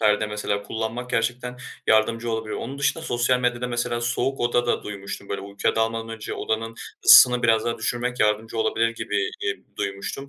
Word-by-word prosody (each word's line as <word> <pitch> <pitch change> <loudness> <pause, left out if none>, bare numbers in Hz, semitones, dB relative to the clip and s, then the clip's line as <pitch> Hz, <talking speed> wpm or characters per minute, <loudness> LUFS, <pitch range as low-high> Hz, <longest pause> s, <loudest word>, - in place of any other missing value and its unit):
perde 105 -1 +3
mesela 105 -1 -2
kullanmak 115 +4 -4
gerçekten 125 +2 -1 0.3
yardımcı 115 +2 +2
olabiliyor. 110 -1 -3
Onun 135 +4 -6
dışında 140 +3 0
sosyal 120 +1 +1
medyada 125 0 0
mesela 120 0 -1
soğuk 125 +3 -1
oda 120 0 +1
da - - 0
duymuştum; 100 -1 -7
böyle, 100 - -3
uykuya 100 +2 -2
dalmadan 115 0 0
önce 115 -1 -6
odanın 115 +1 -2 0.3
ısısını 125 -1 +9
biraz 115 -2 +3
daha 115 -1 -2
düşürmek 120 +2 -2
yardımcı 110 +2 +1
olabilir 115 +1 +2
gibi, 110 -3 -2 0.2
ııı, - - -25
duymuştum. 100 +8 -4
115 Hz, 170 wpm, -24 LUFS, 110-120 Hz, 0.3 s, ısısını